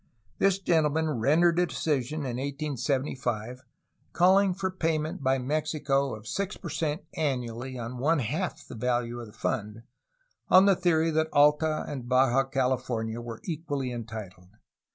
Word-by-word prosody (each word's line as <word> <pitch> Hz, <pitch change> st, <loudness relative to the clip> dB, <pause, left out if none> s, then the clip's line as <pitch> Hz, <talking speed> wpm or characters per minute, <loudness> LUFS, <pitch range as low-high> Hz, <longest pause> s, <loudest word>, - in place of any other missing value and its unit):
This 195 Hz, -1 st, +3 dB
gentleman 160 Hz, -6 st, +1 dB
rendered 165 Hz, +7 st, +4 dB
a 180 Hz, -, +3 dB
decision 150 Hz, -2 st, -1 dB
in 125 Hz, -4 st, -3 dB
1875 130 Hz, -4 st, -2 dB, 0.5 s
calling 190 Hz, +2 st, +5 dB
for 190 Hz, 0 st, -2 dB
payment 160 Hz, -2 st, -1 dB
by 135 Hz, 0 st, +2 dB
Mexico 140 Hz, -1 st, 0 dB
of 110 Hz, 0 st, -12 dB
6 200 Hz, -, -3 dB
per 170 Hz, -, -7 dB
cent 155 Hz, +2 st, -2 dB
annually 130 Hz, -3 st, -2 dB
on 120 Hz, +1 st, -6 dB
one 160 Hz, +6 st, +3 dB
half 150 Hz, -, -3 dB
the -, -, -9 dB
value 120 Hz, 0 st, -1 dB
of 120 Hz, -, -7 dB
the -, -, -13 dB
fund, 110 Hz, 0 st, -3 dB, 0.7 s
on 185 Hz, +1 st, +7 dB
the 200 Hz, -1 st, +5 dB
theory 165 Hz, -3 st, +2 dB
that 160 Hz, 0 st, +1 dB
Alta 150 Hz, +2 st, +3 dB
ahd 130 Hz, -4 st, -6 dB
Baja 130 Hz, +1 st, +3 dB
California 125 Hz, -4 st, -1 dB
were 115 Hz, -1 st, -7 dB
equally 145 Hz, -6 st, -3 dB
entitled. 110 Hz, -6 st, -7 dB
140 Hz, 145 wpm, -28 LUFS, 120-160 Hz, 0.7 s, on